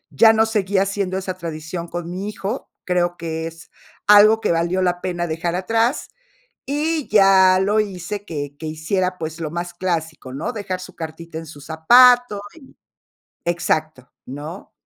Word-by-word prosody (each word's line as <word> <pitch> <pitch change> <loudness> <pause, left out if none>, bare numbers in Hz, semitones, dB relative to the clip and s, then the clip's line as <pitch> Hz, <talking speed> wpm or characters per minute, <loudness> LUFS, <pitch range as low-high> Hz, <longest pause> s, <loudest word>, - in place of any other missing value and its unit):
ya 225 +9 +7
no 220 0 +4
seguía 200 -3 +1
haciendo 195 -1 -2
esa 190 -1 -3
tradición 165 +1 -6
con 175 0 -5
mi 190 +4 -4
hijo, 210 +4 -5 0.2
creo 175 -1 0
que 160 -1 -4
es 165 0 -12 0.4
algo 215 +2 +7
que 215 - +1
valió 170 +3 0
la 175 -1 0
pena 175 -2 -2
dejar 165 +2 -2
atrás, 225 +8 0 0.6
y 300 +2 -1
ya 195 -2 +6
lo 205 +3 +2
hice 205 0 -4
que 145 -5 -6
que 160 - -9
hiciera, 180 +4 -2
pues, 160 0 -5
lo 155 - -3
más 175 +1 -5
clásico, 165 -7 -3
¿no? 150 - -3
Dejar 195 -5 -4
su 185 0 -11
cartita 160 0 -8
en 165 - -7
su 145 -2 -12
zapato 240 - +5
y 325 - -16 0.8
exacto, 155 -6 -1 0.2
¿no? 150 +8 -8
180 Hz, 160 wpm, -21 LUFS, 165-205 Hz, 0.8 s, ya